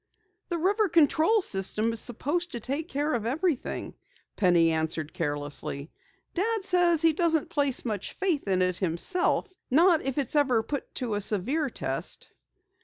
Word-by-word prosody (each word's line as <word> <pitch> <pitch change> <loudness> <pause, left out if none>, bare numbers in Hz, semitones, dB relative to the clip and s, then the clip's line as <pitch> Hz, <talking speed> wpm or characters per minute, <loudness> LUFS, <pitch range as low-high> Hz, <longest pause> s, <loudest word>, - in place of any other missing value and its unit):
"The 345 - -1
river 400 +5 +1
control 330 +7 +3
system 215 - 0
is 225 - -2
supposed 310 +10 -1
to 235 - -3
take 280 +8 -3
care 295 0 -1
of 230 -2 -1
everything," 310 +2 -2 0.4
Penny 175 -4 +3
answered 160 -1 -2
carelessly. 145 -1 -3 0.4
"Dad 435 +3 0
says 350 -4 +3
he 325 -1 +5
doesn't 325 -2 +1
place 280 -4 +1
much 210 -4 -3
faith 355 - -1
in 185 -1 +2
it 180 -1 -1
himself 210 - +1 0.2
not 330 +4 +4
if 270 0 -3
it's 280 0 -1
ever 260 -6 +3
put 285 +4 -5
to 245 -5 -2
a 205 - -1
severe 255 - +1
test." - - -4
280 Hz, 155 wpm, -27 LUFS, 205-340 Hz, 0.4 s, he